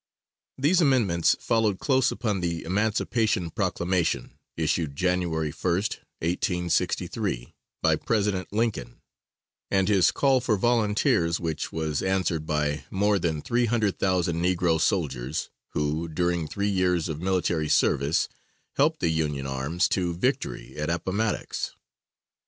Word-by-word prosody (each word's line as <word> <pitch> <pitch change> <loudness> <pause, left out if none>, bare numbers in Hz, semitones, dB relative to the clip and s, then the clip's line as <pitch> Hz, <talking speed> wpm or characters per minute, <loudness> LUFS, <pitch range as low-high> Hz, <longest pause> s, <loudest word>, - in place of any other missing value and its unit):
These 160 +7 +3
amendments 110 - +3
followed 110 -4 +1
close 130 +1 +2
upon 105 -5 -1
the 85 -1 -2
Emancipation 105 -1 0
Proclamation 85 +1 -1 0.2
issued 75 -5 0
January 85 -3 0
1st, 90 +5 -1 0.2
1863, 85 - -1 0.3
by - - +4
President 100 -4 -1
Lincoln, 105 - -2 0.7
and 95 -1 +2
his 100 -4 +4
call 135 -2 +2
for 115 -4 +1
volunteers, 105 -6 +2
which 80 -3 -3
was 80 -2 -2
answered 90 -5 0
by 75 -1 0
more 100 +1 +2
than 80 -3 -1
three 120 0 +1
hundred 110 -4 0
thousand 90 -3 +1
negro 90 -3 +2
soldiers, 75 - -1 0.2
who, 75 +3 -1
during 85 0 -1
three 100 +4 -2
years 90 -3 +1
of 80 -1 -5
military 90 -4 0
service, 70 +4 +2 0.5
helped 155 +3 +2
the 85 - +2
Union 75 -4 -1
arms 70 +7 0
to 90 -3 0
victory - - -2
at 75 +1 -2
Appomattox. 100 +5 -2
90 Hz, 125 wpm, -26 LUFS, 80-105 Hz, 0.7 s, by